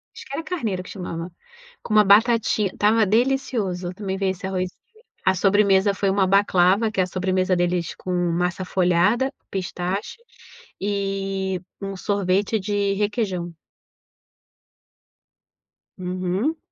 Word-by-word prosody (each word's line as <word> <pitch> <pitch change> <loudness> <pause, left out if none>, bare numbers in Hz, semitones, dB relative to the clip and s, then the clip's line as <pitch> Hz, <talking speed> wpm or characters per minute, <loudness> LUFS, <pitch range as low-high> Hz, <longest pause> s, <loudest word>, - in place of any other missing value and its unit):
Acho - - -10
que 275 - -10
era 320 +3 -3
carneiro 225 - -3
que - - -12
chamava, 175 -2 -6 0.5
com 215 - -4
uma 215 - +7
"batatinha" 215 0 +4
estava 215 +1 +3
delicioso 215 -6 0
também 190 -1 -4
veio 190 -1 +1
esse 190 +1 -7
"arrozinho". 185 -1 -2 0.5
A 190 - +4
sobremesa 200 +1 +3
foi 195 0 0
uma 195 -1 +2
baclava, 195 +2 +3
que 195 - -3
é - - +4
a 180 - -3
sobremesa 185 0 0
deles 175 -1 -1
com 185 - -6 0.2
massa 180 +2 -1
folhada, 190 +9 +2 0.2
pistache, 185 - -3 0.6
e 195 -2 -2 0.2
um 195 0 -4
sorvete 200 +2 0
de 200 0 0
requeijão. 200 -4 -2 2.5
Uhum. 185 - -2
195 Hz, 125 wpm, -23 LUFS, 185-210 Hz, 2.5 s, uma